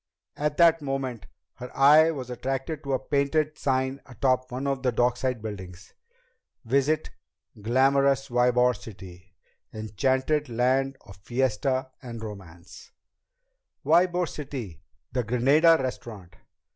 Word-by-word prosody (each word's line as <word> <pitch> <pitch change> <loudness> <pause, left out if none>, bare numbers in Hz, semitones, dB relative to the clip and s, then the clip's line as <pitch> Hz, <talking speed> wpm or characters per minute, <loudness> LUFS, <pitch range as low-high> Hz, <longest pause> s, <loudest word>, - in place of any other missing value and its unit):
At 150 0 -2
that 165 -1 +5
moment 135 -6 -4 0.3
her 125 0 -8
eye 150 +4 +7
was 130 -6 -5
attracted 135 +5 -4
to 140 -1 -2
a - - +3
painted 150 +2 0
sign 130 0 -1
atop 130 0 0
one 130 +3 -4
of 135 -1 -1
the 125 -1 +1
dockside 125 0 0
buildings: 95 -4 -8 0.7
VISIT 140 +6 +1 0.5
GLAMOROUS 135 +4 +2
YBOR 125 0 +3
CITY 95 -3 -13 0.4
Enchanted 130 +8 -1
Land 130 +3 +1
of 100 - -15
Fiesta 130 +4 -1
and 115 -3 -8
Romance 95 -5 -11 0.9
Ybor 175 +2 +3
City! 125 - -7 0.3
The 125 -1 -1
Granada 140 +9 +4
Restaurant! 110 -8 -6
130 Hz, 115 wpm, -26 LUFS, 115-140 Hz, 0.9 s, eye